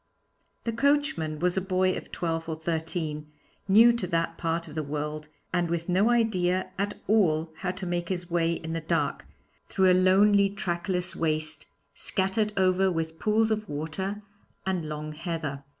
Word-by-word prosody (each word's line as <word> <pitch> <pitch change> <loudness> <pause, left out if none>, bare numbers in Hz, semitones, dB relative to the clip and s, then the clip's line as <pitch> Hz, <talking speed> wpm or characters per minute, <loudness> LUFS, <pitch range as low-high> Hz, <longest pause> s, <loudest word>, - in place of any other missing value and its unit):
The 230 - -1
coachman 255 - +1
was 180 +3 0
a - - +2
boy 185 0 +1
of - - -8
twelve 165 -1 -2
or 160 - -2
thirteen, 160 -2 -3 0.4
new 225 +5 +7
to 235 -6 -2
that 165 -1 0
part 165 0 -2
of 150 - -10
the 155 - -2
world 150 +1 -4 0.3
and 175 -2 +1
with 170 0 -2
no 190 +5 +3
idea 185 -6 +1
at 205 +1 -1
all 165 -7 +3
how 185 - -3
to 185 +1 -4
make 175 -1 -2
his 180 -2 -3
way 170 -1 +1
in 160 -1 -5
the 165 - -2
dark, 160 -2 -1 0.4
through 190 -1 +3
a - - +6
lonely 195 +2 +5
trackless 180 -2 -2
waste, 155 -1 -1 0.3
scattered 205 +2 0
over 190 0 +3
with 160 -1 -3
pools 220 +1 +2
of 215 -1 -1
water 190 +8 -4 0.4
and 180 -5 -1
long 150 0 -5
heather. 155 -3 -4
175 Hz, 165 wpm, -27 LUFS, 160-195 Hz, 0.4 s, new